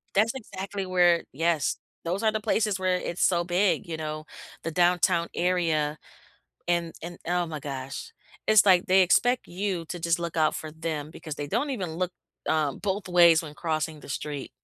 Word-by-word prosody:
That's 220 +3 +4
exactly 195 -5 -5
where 175 -2 +4
yes, 165 0 +1 0.3
those 185 +6 -2
are 220 -1 +3
the 215 - -1
places 210 -2 +1
where 185 -1 +1
it's 175 -1 -3
so 175 -2 +3
big, 185 +2 +1
you 165 -1 -4
know? 155 0 -5 0.4
The 165 - -1
downtown 175 0 +3
area 165 -4 +1 0.7
and 170 -1 0
and 170 +1 -7
oh 175 0 +1
my 155 -2 -5
gosh, 135 -1 -6 0.4
it's 215 -2 +6
like 185 -3 +5
they 190 +1 +5
expect 235 +8 +3
you 180 -2 -2
to 175 +2 -6
just 170 +1 +1
look 170 -1 -4
out 155 -1 +3
for 155 - -6
them 155 -2 -4
because 155 -3 -7
they 145 -1 -4
don't 285 - 0
even 190 -11 -3
look, 180 +1 -2 0.4
um, 150 -3 +1
both 200 -1 -2
ways 170 -2 +6
when 150 -2 -9
crossing 155 -1 -2
the 145 - -13
street. 145 -1 -4
175 Hz, 185 wpm, -27 LUFS, 155-185 Hz, 0.7 s, it's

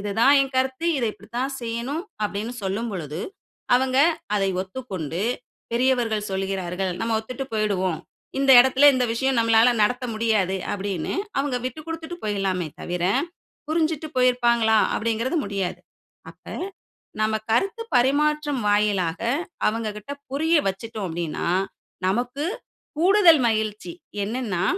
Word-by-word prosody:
"இதுதான் 215 +7 +3
என் 270 -1 -1
கருத்து, 260 +4 0
இத 240 - 0
இப்டித்தான் 240 +6 -4
செய்யணும்" 235 +6 -3 0.2
அப்டின்னு 210 +4 -3
சொல்லும் 200 +5 -2
பொழுது, 160 -2 -5 0.5
அவங்க 260 +1 +2 0.4
அதை 195 -1 +1
ஒத்துக்கொண்டு 190 - -5 0.5
பெரியவர்கள் 235 -4 +1
சொல்கிறார்கள், 190 -1 -2
நம்ம 225 0 0
ஒத்துட்டு 255 +4 -6
போயிடுவோம். 190 -6 0 0.4
இந்த 275 0 +3
இடத்துல 265 +3 +6
இந்த 255 -1 +2
விஷயம் 265 +1 +1
நம்மளால 230 +1 +5
நடத்த 245 +4 +1
முடியாது, 215 -4 +1 0.2
அப்டின்னு 195 -4 -3 0.2
அவங்க 275 -2 0
விட்டுக்கொடுத்துட்டு 320 +5 -5
போயிரலாமே 195 -5 -1
தவிர, 175 0 -3 0.6
புரிஞ்சுட்டு 315 -1 0
போயிருப்பாங்களா 240 -3 +3 0.2
அப்டிங்கிறது 230 +8 0
முடியாது. 195 -2 -3 0.5
அப்ப - - -23 0.8
நம்ம 220 0 +1 0.2
கருத்து 390 - +1
பரிமாற்றம் 290 +1 +2
வாயிலாக 200 -5 +1 0.5
அவங்ககிட்ட 215 +2 -3 0.2
புரிய 320 +4 +2
வச்சுட்டோம் 215 +1 -4
அப்டின்னா, 165 0 -3 0.6
நமக்கு 245 +9 -1 0.5
கூடுதல் 350 -5 +6
மகிழ்ச்சி 215 +6 -1 0.3
என்னன்னா, 210 -5 -2
230 Hz, 110 wpm, -24 LUFS, 200-265 Hz, 0.8 s, இடத்துல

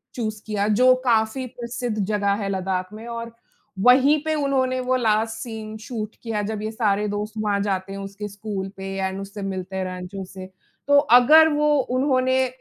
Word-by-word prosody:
Choose 215 -3 -3
किया, 210 -1 -1
जो 250 +4 +5
काफ़ी 230 +2 +1
प्रसिद्ध 240 -2 -5
जगह 205 -1 +1
है - - -2
लद्दाख़ 185 0 -2
में, 225 +2 -9
और 230 0 -6 0.5
वहीं 265 +6 +5
पे 315 0 +1
उन्होंने 265 -3 0
वो 255 +1 +1
लास्ट 225 -2 +1
सीन 220 -2 -7
शूट 220 -1 -6
किया, 220 -2 -2
जब 215 0 -4
ये 215 +1 -3
सारे 210 -2 0
दोस्त 210 +1 -3
वहाँ 205 -2 0
जाते 195 -1 -2
हैं, 195 - -6
उसके 200 +1 -6
स्कूल 200 -1 -5
पे 190 0 -6
एंड 190 0 -2
उससे 200 +1 -8
मिलते 190 -1 -5
हैं, 190 - -1
रैंचो 185 +1 -6
से। 185 0 -10 0.4
तो 285 - +6
अगर 285 +4 +7
वो 300 0 +3
उन्होंने 260 0 +1
215 Hz, 180 wpm, -23 LUFS, 200-250 Hz, 0.5 s, अगर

